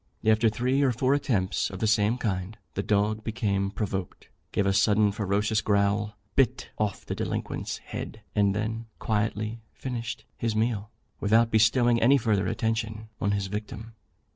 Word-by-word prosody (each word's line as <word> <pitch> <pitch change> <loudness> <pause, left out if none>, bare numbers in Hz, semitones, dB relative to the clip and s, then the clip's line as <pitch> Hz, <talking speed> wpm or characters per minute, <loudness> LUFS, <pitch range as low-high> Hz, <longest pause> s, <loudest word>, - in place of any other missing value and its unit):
After 110 +1 +4
three 125 +5 +1
or 135 -2 +4
four 130 +3 +2
attempts 105 -9 0
of 95 - -7
the 110 - -1
same 105 +2 +3
kind, 100 -3 -2 0.2
the 100 - -1
dog 105 +1 +1
became 100 -3 0
provoked, 95 -3 -4 0.2
gave 100 - +1
a 95 - +3
sudden 105 +1 +4
ferocious 105 +2 0
growl, 100 0 +1 0.2
bit 135 -4 +1
off 105 -2 -1
the - - -3
delinquent's - - -3
head, 110 - -7
and 100 -2 +2
then 110 +2 -3
quietly 110 +1 -1
finished 120 -2 -5
his 115 -2 -1
meal, 110 -2 0 0.3
without 115 +2 +3
bestowing 115 +2 +4
any 135 +5 +6
further 105 -6 +1
attention 110 0 -2
on 100 - 0
his 100 -1 0
victim. 110 +3 -6
110 Hz, 155 wpm, -27 LUFS, 100-115 Hz, 0.3 s, any